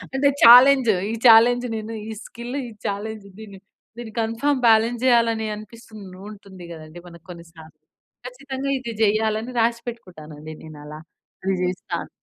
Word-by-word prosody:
అంటే 280 +1 +3
ఛాలెంజ్ 250 +1 +7 0.2
ఈ - - -4
చాలెంజ్ 240 +2 +5
నేను 220 +1 -7
ఈ - - -5
స్కిల్, 240 +3 -8
ఈ - - -13 0.2
చాలెంజ్ 210 +1 -6
దీన్ని 200 -3 -12 0.4
దీన్ని 235 -2 -9
కన్ఫర్మ్ 230 +5 -1
బాలన్స్ 225 +1 +2
జేయాలని 230 -3 +2
అనిపిస్తుంది 215 -3 -13
ఉంటుంది 195 -3 -13
గదండీ 160 +1 -12
మనకు 170 -1 -16
కొన్ని 170 -1 -12
సార్లు! 160 -2 -15 0.5
ఖచ్చితంగా 265 +2 -6
ఇది 235 -2 -7
చెయ్యాలని 220 +3 0
రాషిపెట్టుకుంటానండి 185 -10 -6
నేను 155 -2 -12
అలా. 150 +1 -10 0.5
అది 195 0 0
జేస్తాను. 180 0 -4
220 Hz, 135 wpm, -22 LUFS, 185-240 Hz, 0.5 s, ఛాలెంజ్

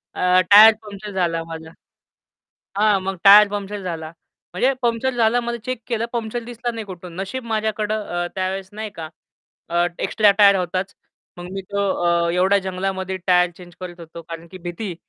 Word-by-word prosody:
अ, 180 0 +3
tyre 215 +1 +9
puncture 205 0 -9
झाला 170 -3 -1
माझा 160 0 -9 1.1
हां, 210 -2 +3
मग 190 0 -3
टायर 205 +1 +9
पंक्चर 205 0 -5
झाला. 165 -3 -5 0.4
म्हणजे 255 +9 +2
पंक्चर 235 +2 +1
झाला 235 +1 +3
मला 235 0 -3
चेक 255 -2 -4
केलं, 230 -1 -2
पंक्चर 235 0 -3
दिसला 240 0 -4
नाही 225 -1 -6
कुठून. 180 -2 -10
नशीब 235 +6 -5
माझ्याकडं 215 -1 -2
अ, 175 -1 -3
त्यावेळेस 190 0 -3
नाही 215 0 -6
का 160 -1 -6 0.6
अ, 175 +1 +1
एक्स्ट्रा 210 -2 +3
टायर 200 -1 +7
होताच. 185 +2 -3 0.4
मग 175 +1 -9
मी 195 0 -5
तो 200 0 0 0.2
अ, 170 0 +2
एवढ्या 190 +3 +3
जंगलामध्ये 190 0 -3
टायर 180 -1 +4
चेंज 175 -1 -14
करत 175 -1 -8
होतो 170 0 -10
कारण 165 +1 -9
की 185 - -10
भीती 175 +1 -5
195 Hz, 170 wpm, -21 LUFS, 175-215 Hz, 1.1 s, टायर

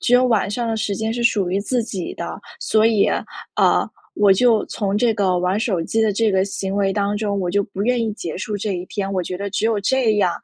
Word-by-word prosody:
只 245 - 0
有 250 +1 +5
晚 215 -5 +1
上 235 +2 -2
的 225 - -1
时 210 -2 -1
间 220 +2 -2
是 240 0 -3
属 200 -6 +2
于 190 - +1
自 240 +3 0
己 190 -6 -5
的， - - -6 0.2
所 220 0 +2
以， 220 -3 +3 0.5
呃， - - +3 0.3
我 205 -1 +4
就 230 +2 +3
从 200 -1 -2
这 235 -1 +2
个 190 -4 +1
玩 180 +3 0
手 205 -7 0
机 225 +6 0
的 215 -2 +2
这 220 +1 +1
个 190 0 +2
行 195 -1 -4
为 195 -1 +1
当 205 0 0
中， 205 -2 -1
我 180 - -1
就 200 +2 +2
不 200 -2 -5
愿 245 +2 +2
意 220 -2 -1
结 170 -6 -6
束 205 +3 -4
这 205 0 -2
一 180 0 -4
天。 195 -2 -3
我 185 -2 -1
觉 180 - -5
得 200 +1 -3
只 200 +2 -2
有 220 -2 +1
这 230 -1 +2
样， 190 -4 +3
205 Hz, 275 characters per minute, -21 LUFS, 195-225 Hz, 0.5 s, 有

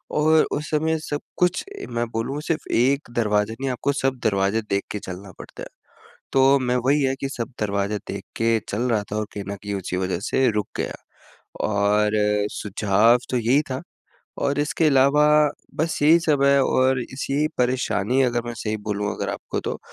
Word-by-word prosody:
और 155 +1 +4
उस 150 +1 -3
समय 160 +1 +1
सब 145 -1 -4 0.2
कुछ 180 +1 +1
ए, 405 0 -8
मैं 120 0 -1
बोलूँ 130 +6 -3
सिर्फ़ 165 - -2
एक 135 +4 +2
दरवाज़ा 105 -1 +1
नहीं 135 - -1
आपको 125 +3 -1
सब 135 -2 -1
दरवाज़े 100 +1 +2
देख 100 0 0
के 105 - -3
चलना 95 +1 -8
पड़ता - - -10
है। - - -7 0.7
तो 135 +1 +5
मैं 125 -1 0
वही 145 +2 +3
है 135 -1 +1
कि 135 - -2
सब 125 -1 -5
दरवाज़े 100 0 -1
देख - - -5
के 115 0 +2
चल 105 +4 -2
रहा 110 -3 +1
था - - -1
और 105 0 -1
कहीं 100 - -5
न 100 - -5
कहीं 100 +1 -5
उसी 95 -1 -3
वजह 90 -1 -1
से 130 -1 +3
रुक 105 -2 -1
गया। - - -2 0.7
और 105 0 +2 0.4
सुझाव 105 +3 +2
तो 125 - +1
यही 125 +6 +3
था 130 +3 -3 0.6
और 140 0 0
इसके 150 +2 +1
अलावा 140 +1 +4 0.5
बस 160 +2 -1
यही 160 +3 +7
सब 150 -4 +1
है 140 0 +5
और 130 0 +2
इस 130 +3 -6
यही 150 +2 +1
परेशानी 125 -1 +1
अगर 120 -2 +1
मैं 120 - -4
सही 110 -1 -2
बोलूँ 105 0 -1
अगर - - -3
आपको - - -4
तो - - -4
125 Hz, 195 wpm, -23 LUFS, 105-140 Hz, 0.7 s, यही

